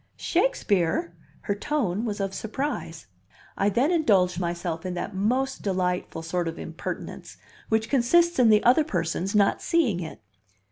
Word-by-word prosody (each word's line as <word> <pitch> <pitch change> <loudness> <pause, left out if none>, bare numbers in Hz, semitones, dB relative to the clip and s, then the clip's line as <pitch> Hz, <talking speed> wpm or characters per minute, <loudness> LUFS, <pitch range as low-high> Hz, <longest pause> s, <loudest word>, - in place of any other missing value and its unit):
"Shakespeare!" 180 - +1 0.3
Her 200 - -1
tone 215 -3 -1
was 210 -3 -3
of 195 -1 -2
surprise. 270 +9 -4 0.5
I 200 - +2
then 245 - +2
indulged 195 - +3
myself 170 -1 -3
in 180 -1 -4
that 175 - -4
most 250 +8 0
delightful 180 -4 -2
sort 170 +1 -2
of 165 +1 -4
impertinence, - - -7 0.3
which 220 0 +1
consists 335 +6 +3
in 240 -3 +6
the 210 -1 +5
other 255 +6 +5
person's 180 - -2
not 205 -1 +3
seeing 275 - +1
it. 160 -3 -7
200 Hz, 145 wpm, -26 LUFS, 180-255 Hz, 0.5 s, in